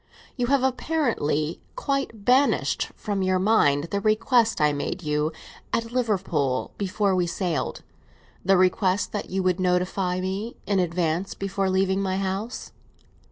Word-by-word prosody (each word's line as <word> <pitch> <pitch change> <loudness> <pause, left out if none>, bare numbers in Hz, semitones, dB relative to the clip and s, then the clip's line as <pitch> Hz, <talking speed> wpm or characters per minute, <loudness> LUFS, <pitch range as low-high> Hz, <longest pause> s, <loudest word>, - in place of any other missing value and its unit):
"You 245 -2 -1
have 275 0 +2
apparently 240 - 0
quite 275 - -2
banished 265 +3 +3
from 205 -3 -3
your 185 0 +2
mind 170 -7 +3
the 200 - 0
request 225 +1 +2
I 150 -1 +3
made 175 +5 -3
you 150 +1 0 0.4
at 230 0 -1
Liverpool, 185 - 0
before 200 0 +1
we 180 -1 +1
sailed; 170 -2 -2 0.6
the 195 +1 +4
request 185 +1 +2
that 210 - -4
you 190 +1 -1
would 185 0 +1
notify 180 0 0
me 195 +5 -3
in 200 -2 +1
advance 175 +1 -1
before 195 0 -1
leaving 190 +1 +1
my 190 -1 -1
house." 195 +5 -3
190 Hz, 140 wpm, -25 LUFS, 180-220 Hz, 0.6 s, the